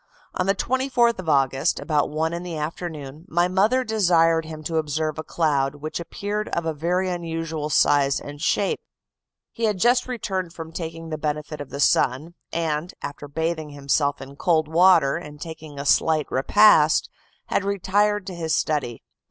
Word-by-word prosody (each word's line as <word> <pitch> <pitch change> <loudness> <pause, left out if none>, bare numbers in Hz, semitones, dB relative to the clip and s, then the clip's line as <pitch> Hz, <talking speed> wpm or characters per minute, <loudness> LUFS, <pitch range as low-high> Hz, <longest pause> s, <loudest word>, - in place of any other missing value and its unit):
On 185 - -1
the 195 - +3
24th 245 -1 +1
of 180 -3 -4
August, 135 -2 +2
about 150 0 0
one 160 +2 -1
in 170 - -3
the 175 -3 -5
afternoon, 150 -2 -6
my 175 -1 +2
mother 210 +8 +2
desired 170 -7 +3
him 155 -1 -8
to 165 +1 -2
observe 155 0 -1
a - - -3
cloud 145 -5 0
which 155 +3 -5
appeared 205 +5 -4
of 170 - -2
a 160 - -1
very 175 +5 0
unusual 165 -3 -3
size 140 -2 +3
and 145 0 -9
shape. 195 +4 +1 0.7
He 230 - -2
had 210 -3 +1
just 245 +5 +3
returned 190 -8 -3
from 160 -1 -8
taking 165 -1 -6
the 155 -1 -4
benefit 150 0 -3
of 145 - -8
the 140 - -7
sun, 140 +3 +2 0.2
and, 165 0 -2
after 145 0 -6
bathing 160 +1 -2
himself 140 0 0
in 140 +1 -12
cold 160 -2 +2
water, 165 -3 +4
and 150 -4 -10
taking 160 -2 -9
a 140 - -5
slight 155 +1 +3
repast, 155 +2 +5 0.4
had - - +1
retired 200 +1 +1
to 190 - -6
his 160 -3 -1
study. 145 -7 -1
160 Hz, 170 wpm, -23 LUFS, 150-185 Hz, 0.7 s, repast